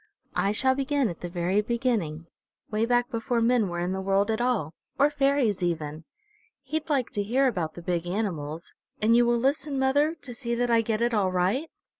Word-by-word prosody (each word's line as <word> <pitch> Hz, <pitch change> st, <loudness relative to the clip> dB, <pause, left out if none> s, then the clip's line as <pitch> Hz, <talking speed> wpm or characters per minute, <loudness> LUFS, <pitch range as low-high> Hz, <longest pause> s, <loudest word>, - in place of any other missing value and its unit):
I 200 Hz, -, +1 dB
shall 260 Hz, +5 st, +2 dB
begin 275 Hz, -2 st, 0 dB
at 170 Hz, -, -7 dB
the 175 Hz, -, -4 dB
very 180 Hz, +3 st, +1 dB
beginning, 210 Hz, -9 st, -1 dB, 0.5 s
way 215 Hz, +2 st, +1 dB
back 245 Hz, +1 st, +2 dB
before 235 Hz, +1 st, -1 dB
men 230 Hz, -3 st, +2 dB
were 175 Hz, -, -4 dB
in 175 Hz, +1 st, -1 dB
the 190 Hz, 0 st, -2 dB
world 195 Hz, +2 st, +1 dB
at 220 Hz, +2 st, -1 dB
all, 230 Hz, -11 st, 0 dB, 0.2 s
or 285 Hz, +2 st, +4 dB
fairies 275 Hz, -8 st, +1 dB
even. 160 Hz, -3 st, -2 dB, 0.6 s
He'd 310 Hz, +4 st, -3 dB
like 270 Hz, -5 st, 0 dB
to 205 Hz, -, -1 dB
hear 250 Hz, +7 st, +2 dB
about 175 Hz, -10 st, -2 dB
the 175 Hz, -, -9 dB
big 175 Hz, -1 st, -1 dB
animals. 170 Hz, -5 st, -3 dB, 0.3 s
And 225 Hz, +2 st, +4 dB
you 240 Hz, 0 st, +5 dB
will 240 Hz, 0 st, +3 dB
listen, 275 Hz, +3 st, 0 dB
mother, 285 Hz, +4 st, +2 dB
to 280 Hz, -6 st, -10 dB
see 235 Hz, -1 st, -3 dB
that 245 Hz, 0 st, 0 dB
I 230 Hz, -1 st, +5 dB
get 225 Hz, 0 st, -1 dB
it 240 Hz, 0 st, +1 dB
all 195 Hz, -4 st, +2 dB
right?" 195 Hz, -, 0 dB
230 Hz, 205 wpm, -27 LUFS, 180-260 Hz, 0.6 s, you